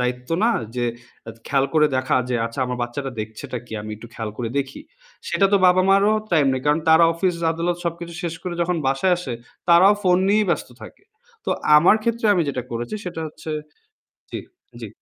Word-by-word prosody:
দায়িত্ব 125 +2 -3
না 230 - +4 0.3
যে 120 - 0 0.6
খেয়াল 135 0 +2
করে 150 -1 +5
দেখা 130 0 +1
যে, 125 - -1
"আচ্ছা 115 +2 -9
আমার 125 0 -4
বাচ্চাটা 135 +3 -4
দেখছেটা 110 +3 -6
কি? - - -13
আমি 110 - -7
একটু 115 +2 -12
খেয়াল 110 -2 -4
করে 120 -2 -3
দেখি?" 135 -1 -4 0.5
সেটা 195 - +3
তো - - +7
বাবা-মারও 195 +3 +4 0.2
টাইম 150 -4 +4
নেই, 130 -1 -2
কারণ 150 +2 +3
তারা 160 +1 +7
অফিস-আদালত 170 -1 0
সবকিছু 170 0 -4
শেষ 170 -2 -3
করে 180 -1 -4
যখন 175 +1 0
বাসায় 135 +8 +2
আসে 150 -8 -5 0.4
তারাও 180 +4 +7
ফোন 180 -2 +4
নিয়েই 210 0 +3
ব্যস্ত - - -1
থাকে। - - -13 0.4
তো - - -2 0.3
আমার 170 +7 +6
ক্ষেত্রে 230 0 0
আমি 175 - +2
যেটা 130 -2 -2
করেছি 120 - -4
সেটা 175 -3 -5
হচ্ছে 155 +1 -9 0.8
জি, - - -4 0.4
জি, - - -6
160 Hz, 185 wpm, -22 LUFS, 130-180 Hz, 0.8 s, তো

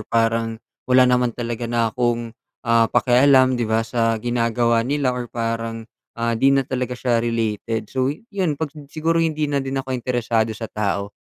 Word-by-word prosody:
parang, 115 0 +1 0.3
wala 130 0 +6
naman 125 -1 +3
talaga 120 -1 -4
na 115 -2 0
akong, 120 -2 -1 0.3
ah, 115 -1 +3
pakialam, 130 0 +4
'di 115 - -1
ba, 110 0 +1
sa 115 -1 0
ginagawa 115 0 +1
nila 140 -3 +1
or 125 -1 -5
parang, 115 -1 -3 0.3
ah, 115 0 0
'di 115 +4 +3
na 135 - +2
talaga 125 -1 -3
siya 120 -2 +1
related. 115 -1 -2
So, 130 0 +1
iyon 180 -1 -3
'pag 155 -2 -4
sin 150 -3 -12
siguro 165 +2 0
hindi 155 -2 0
na 145 -1 0
din 135 0 -4
ako 130 -1 -3
interesado 115 -3 -1
sa 115 - -6
tao, 100 -2 -2
120 Hz, 175 wpm, -21 LUFS, 115-130 Hz, 0.3 s, wala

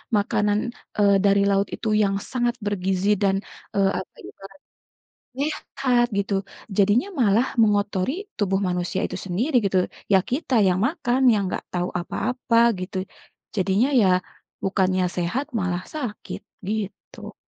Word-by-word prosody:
makanan, 205 0 +1 0.4
eee, 200 -1 +5
dari 200 0 +4
laut 200 0 +2
itu 225 - -3
yang 195 -1 +1 0.2
sangat 240 -1 0
bergizi 195 0 +1
dan, 195 -2 +2 0.4
eee, 195 -1 +3
apa, 185 - -7
jadi - - -11
makanan 195 0 -13 0.8
sehat 255 -4 0
gitu 200 0 -1 0.4
jadinya 210 - +3
malah 235 -1 +3
mengotori 210 - +1
tubuh 195 -2 +1
manusia 180 -2 -1
itu - - -6
sendiri 225 - -1
gitu, 190 -1 +2 0.3
ya, 190 - +7
kita 270 0 0
yang 185 0 +2
makan 265 -5 -1
yang 205 -2 +1
nggak - - -4
tahu 180 0 -1
apa-apa 245 +5 -1 0.2
gitu. 185 +1 -5 0.6
Jadinya 195 +6 +2
ya, 195 - +4 0.5
bukannya 190 -1 +1
sehat 180 +11 -1
malah 180 -3 -1
sakit 250 -9 -6 0.3
gitu. 210 -1 -5
200 Hz, 135 wpm, -23 LUFS, 190-240 Hz, 0.8 s, ya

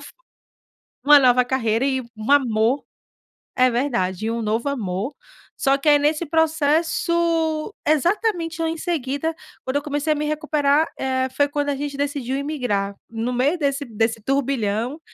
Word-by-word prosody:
f - - -12 0.9
uma 290 +1 +8
nova 250 -1 +4
carreira 235 -2 0
e 265 -2 0
um 220 +5 -5
amor. 245 -1 +3 0.7
É 255 0 +4
verdade, 220 -6 -1
e 225 - 0
um 230 - -2
novo 225 +4 -1
amor. 215 +1 -3 0.4
Só 275 0 +2
que 275 - -10
aí 290 0 +7
nesse 300 +3 +1
processo, 320 +2 +1
exatamente 335 - +1
eu 325 - +1
em 325 0 -3
seguida, 315 -1 -2 0.3
quando 260 +2 -2
eu 285 - 0
comecei 295 +1 -1
a - - -5
me 300 - -2
recuperar, 300 0 +1
eh, 260 0 0
foi 285 - +4
quando 290 0 -2
a 285 - 0
gente 285 0 -4
decidiu 280 -3 -2
imigrar. 250 -9 -2 0.2
No 230 +2 -3
meio 270 +8 +1
desse 285 -1 -1
desse 225 -1 -1
turbilhão, 255 -1 -1
280 Hz, 160 wpm, -22 LUFS, 245-305 Hz, 0.9 s, uma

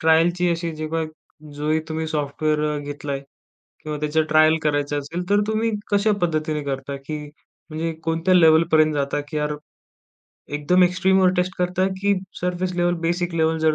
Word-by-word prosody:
ट्रायलची 170 +2 +3
अशी 170 0 -2
जेव्हा 155 +1 -2 0.5
जोही 155 +2 0
तुम्ही 160 0 -3
सॉफ्टवेअर 150 0 -1
घेतलाय 145 -1 -5 0.6
किंवा 150 -1 -4
त्याच्या 150 +1 +1
ट्रायल 155 +1 +5
करायचं 145 -1 0
असेल, 170 +5 -5
तर 205 0 +4
तुम्ही 220 +1 0 0.2
कशा 205 +1 +3
पद्धतीने 155 -3 -1
करता 140 0 -4
की 155 - -3 0.5
म्हणजे 160 +1 -2
कोणत्या 165 +3 +1
लेव्हलपर्यंत 160 -2 +5
जाता? 140 0 -1
की 150 - -4
यार 150 0 -1 1.0
एकदम 150 +5 +3
एक्स्ट्रीमवर 185 +1 +3
टेस्ट 180 +1 0
करता 180 +1 +1
की 200 0 +3 0.3
सरफेस 180 +1 -1
लेव्हल, 175 0 +1
बेसिक 175 0 -1
लेव्हल 160 0 +1
जर 160 -1 +2
160 Hz, 150 wpm, -22 LUFS, 150-175 Hz, 1.0 s, ट्रायल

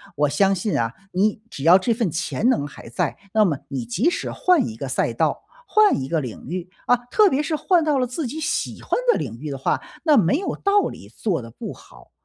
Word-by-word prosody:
我 145 0 +2
相 195 +6 +3
信 195 +3 -2
啊， 115 +1 -1 0.2
你 205 +3 +1
只 135 - -7
要 175 +3 +8
这 225 +5 +1
份 220 -4 0
潜 185 +8 -1
能 145 - +1
还 145 - -11
在， 120 - -2 0.2
那 215 -1 +5
么 150 -8 0
你 130 -4 -4
即 195 - +1
使 - - -3
换 360 -4 +3
一 110 - -7
个 135 - -5
赛 125 -2 0
道、 - - 0 0.2
换 430 - +4
一 130 - -4
个 160 +2 0
领 125 -1 -8
域， 180 +2 -5 0.2
啊， 245 - +5 0.2
特 425 -3 +5
别 285 +3 0
是 310 +2 -1
换 350 +1 +3
到 295 -3 +2
了 250 - +1
自 265 +6 -4
己 300 +6 -5
喜 300 - -2
欢 - - -17 0.2
的 - - 0
领 115 -2 -5
域 150 - -4
的 135 - -4
话， 135 - 0 0.2
那 310 -3 +5
没 190 +3 +3
有 390 - -3
道 400 0 +2
理， - - -10
做 180 - -2
得 115 - -10
不 - - -7
好， - - -18
190 Hz, 260 characters per minute, -22 LUFS, -, 0.2 s, 要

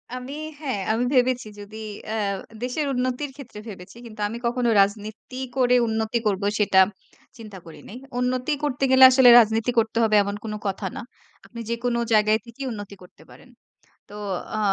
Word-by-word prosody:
আমি 255 +2 -7 0.3
হ্যাঁ, 265 -9 -3
আমি 230 +3 0
ভেবেছি 250 -3 +2
যদি 205 +1 -10 0.3
অ্যা 220 - -3 0.5
দেশের 255 +4 -2
উন্নতির 255 +3 -2
ক্ষেত্রে 265 -7 -11
ভেবেছি 195 +1 -11
কিন্তু 215 -2 -12
আমি 230 +3 -6
কখনো 240 0 0
রাজনীতি 215 +5 -3 0.2
করে 250 -1 +4
উন্নতি 220 +1 -1
করবো 200 -1 -1
সেটা 195 -2 +4 0.6
চিন্তা 215 -4 -10
করি 165 - -12
নাই। 235 - -9 0.2
উন্নতি 250 +2 -1
করতে 275 -2 -2
গেলে 260 0 +7
আসলে 255 -1 +6
রাজনীতি 225 +1 +2
করতে 225 0 -1
হবে 215 -1 +3
এমন 200 0 -4
কোনো 215 -1 -5
কথা 195 +1 -3
না। - - -5 0.4
আপনি 235 - -11
যেকোনো 235 +1 -1
জায়গায় 215 0 +4
থেকেই 235 +4 -8
উন্নতি 205 -2 -8
করতে 180 - -18
পারেন। - - -17 0.6
তো 205 - -13 0.4
আ - - -2
230 Hz, 165 wpm, -23 LUFS, 210-250 Hz, 0.6 s, গেলে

